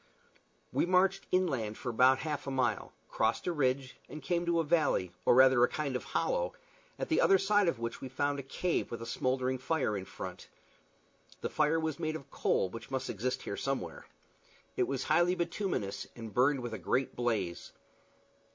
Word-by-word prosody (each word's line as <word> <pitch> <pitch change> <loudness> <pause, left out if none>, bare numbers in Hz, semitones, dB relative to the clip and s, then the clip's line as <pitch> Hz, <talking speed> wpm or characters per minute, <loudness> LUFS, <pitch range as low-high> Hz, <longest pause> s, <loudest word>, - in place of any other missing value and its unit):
We - - +2
marched 190 +1 +3
inland 135 -13 0
for 120 - -4
about 130 +3 +5
half 150 -2 -3
a - - 0
mile, 125 -6 0 0.2
crossed 110 +1 0
a 180 - +1
ridge, 130 -3 0
and 155 - -7
came 175 +3 0
to 170 -1 +2
a - - +2
valley, 150 - +1
or - - +6
rather 130 -1 +7
a - - +6
kind 145 -4 -3
of 125 - -3
hollow, - - 0 0.4
at - - -3
the 320 - +2
other 195 - +6
side 205 0 +3
of 170 - +1
which 115 0 -5
we 130 - -6
found 145 +2 -1
a - - -2
cave 165 +6 -1
with 120 - -5
a 115 - -6
smouldering 130 +1 -1
fire 130 -5 0
in 95 -1 -4
front. - - -8 0.9
The - - -3
fire 155 +2 +2
was 160 -1 -2
made 155 -1 -2
of 140 -4 -9
coal, - - +1
which 115 +4 -9
must 130 -1 -2
exist 125 +5 -2
here 100 - -4
somewhere. 135 0 -3 0.7
It - - +1
was 135 -1 -2
highly 175 +3 +3
bituminous, 170 - -2
and 115 -3 -8
burned 130 +4 +3
with 120 -2 -5
a - - -4
great 130 0 0
blaze. 105 -8 -2
135 Hz, 190 wpm, -32 LUFS, 120-165 Hz, 0.9 s, rather